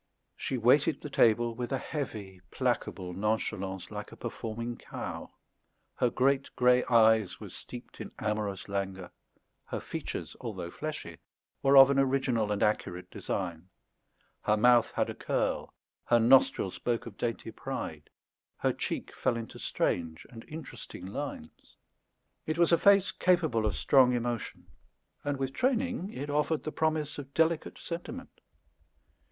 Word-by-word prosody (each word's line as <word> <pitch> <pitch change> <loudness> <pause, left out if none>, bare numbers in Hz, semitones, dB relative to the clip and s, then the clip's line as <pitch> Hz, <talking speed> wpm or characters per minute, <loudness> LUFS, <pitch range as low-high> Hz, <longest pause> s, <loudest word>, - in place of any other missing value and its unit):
She 130 - -2
waited 135 +6 +4
the 150 - -7
table 115 -1 +4
with 120 +2 -5
a 135 - +1
heavy 105 - -5
placable 90 -1 -2
nonchalance, 95 -2 -2
like 105 0 -6
a - - -10
performing 115 +1 -5
cow; - - -6 0.7
her 125 - +3
great 135 +3 +2
grey 125 0 +5
eyes 110 -4 +4
were - - -8
steeped - - -9
in - - -7
amorous 105 -2 -2
languor; 95 -2 -3 0.5
her - - -4
features, - - -5
although 85 - -5
fleshy, 150 - -6 0.4
were 140 0 +5
of 135 0 +10
an 135 - +3
original 130 -5 +1
and 105 - +1
accurate 90 -4 -1
design; 90 -2 -4 0.7
her 105 - +2
mouth 120 +1 +5
had - - +1
a - - -4
curl; - - -1 0.3
her 120 - +4
nostril 115 -5 +5
spoke 120 +3 -2
of 115 -4 -9
dainty 115 0 -3
pride; 110 - -6 0.5
her - - +1
cheek - - -4
fell 120 - 0
into 115 -1 -7
strange 80 -2 -1
and 115 -2 -10
interesting 150 - -8
lines. 100 - -7 0.7
It 155 +1 -1
was 170 -1 +4
a 170 - +6
face 200 -1 +5
capable 160 -12 +2
of 100 - -1
strong 130 - +5
emotion, 120 -1 -3 0.6
and, 145 -1 -1
with 135 0 -2
training, 250 -5 0
it 145 +3 -5
offered 150 +1 +1
the 155 - -3
promise 155 -2 -1
of 140 -1 -10
delicate 165 0 +1
sentiment. 230 +10 -7
120 Hz, 145 wpm, -30 LUFS, 105-145 Hz, 0.7 s, of